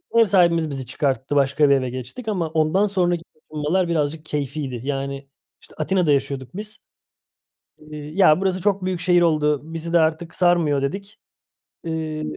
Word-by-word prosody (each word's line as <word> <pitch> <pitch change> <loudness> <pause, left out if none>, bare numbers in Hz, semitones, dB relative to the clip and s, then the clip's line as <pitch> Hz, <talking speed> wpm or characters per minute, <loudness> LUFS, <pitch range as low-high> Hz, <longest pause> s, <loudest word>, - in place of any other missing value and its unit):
Eee, 230 - +7
ev - - +6
sahibimiz 170 -5 +3
bizi 135 -2 -5
çıkarttı, 130 +1 -2
başka 140 +1 +3
bir 140 - +6
eve 130 -2 -1
geçtik 130 - -7
ama 180 -7 -1
ondan 160 +5 +2
sonraki 175 -4 0
taşınmalar 155 +4 -2
birazcık 155 -1 -1
keyfiydi. 140 -4 -4
Yani, 140 0 -4 0.3
işte, - - -17
Atina'da 170 0 +1
yaşıyorduk 135 -2 -1
biz. 215 +1 -7 1.0
Eee, 150 0 -10
"Ya, 155 +2 +3
burası 185 -1 0
çok 200 -2 +1
büyük 185 -2 -2
şehir 175 0 +3
oldu, 150 -3 +2
bizi 165 +1 -4
de 170 - +5
artık 160 +1 0
sarmıyor" 170 -6 +2
dedik. 195 +9 -4 0.7
Eee, 160 -2 -3
155 Hz, 160 wpm, -22 LUFS, 145-175 Hz, 1.0 s, Eee